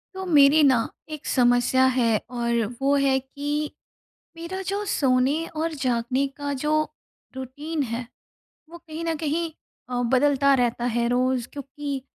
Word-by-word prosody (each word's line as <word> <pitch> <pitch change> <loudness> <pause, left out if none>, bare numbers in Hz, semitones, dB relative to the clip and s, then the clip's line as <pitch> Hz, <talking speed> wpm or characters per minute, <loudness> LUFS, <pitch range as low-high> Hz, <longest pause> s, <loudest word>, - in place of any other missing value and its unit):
तो 380 0 -5
मेरी 300 -2 +6
ना, 265 -3 +5 0.3
1 305 -2 -7
समस्या 245 +1 +3
है, 230 -3 +3
और 235 -2 0 0.2
वो 280 +1 +3
है 275 -1 +3
कि 290 +3 -3 0.7
मेरा 345 +3 -5
जो 400 +1 -1
सोने 275 -1 +2
और 325 +1 -1
जागने 255 -1 0
का 285 0 -3
जो 300 - +1 0.6
रूटीन 285 +5 -4
है, 235 -1 -4 0.6
वो 340 - -10
कहीं 330 -1 -8
न 330 -1 0
कहीं 320 +2 -1 0.4
अ, 245 -1 -1
बदलता 275 +2 +3
रहता 240 -1 0
है, 235 -1 0
रोज़ 250 0 +1
क्योंकि 280 -1 -5
275 Hz, 145 wpm, -24 LUFS, 250-305 Hz, 0.7 s, मेरी